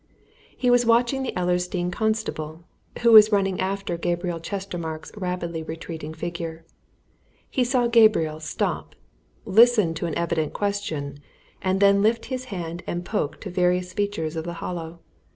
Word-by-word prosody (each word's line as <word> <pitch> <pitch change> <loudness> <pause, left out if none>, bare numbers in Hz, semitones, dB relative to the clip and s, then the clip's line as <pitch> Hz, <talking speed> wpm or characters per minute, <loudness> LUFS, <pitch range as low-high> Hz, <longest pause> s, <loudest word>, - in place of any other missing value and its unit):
He 250 -1 +2
was 245 0 +5
watching 240 +3 +3
the 265 - -2
Ellersdeane 180 0 0
constable, 180 -7 -2 0.4
who 235 - +6
was 215 -1 +9
running 195 -3 +1
after 190 -2 -2
Gabriel 175 0 -2
Chestermarke's 170 -4 -5
rapidly 180 -4 -3
retreating 160 -1 -7
figure. 165 -1 -5 0.9
He 255 - +2
saw 245 0 +2
Gabriel 215 -10 +4
stop, 155 - -3 0.5
listen 215 -4 +5
to 165 +1 -3
an 160 - -3
evident 170 -2 -1
question, 155 -9 -3 0.4
and 190 0 0
then 200 0 +5
lift 225 +3 +2
his 255 0 -3
hand 175 -6 -5
and 175 0 -3
point 155 -8 -2
to 195 - -6
various 180 0 +1
features 200 -7 -2
of 160 - -3
the 170 +1 -5
Hollow. 170 -1 -6
180 Hz, 145 wpm, -24 LUFS, 165-210 Hz, 0.9 s, was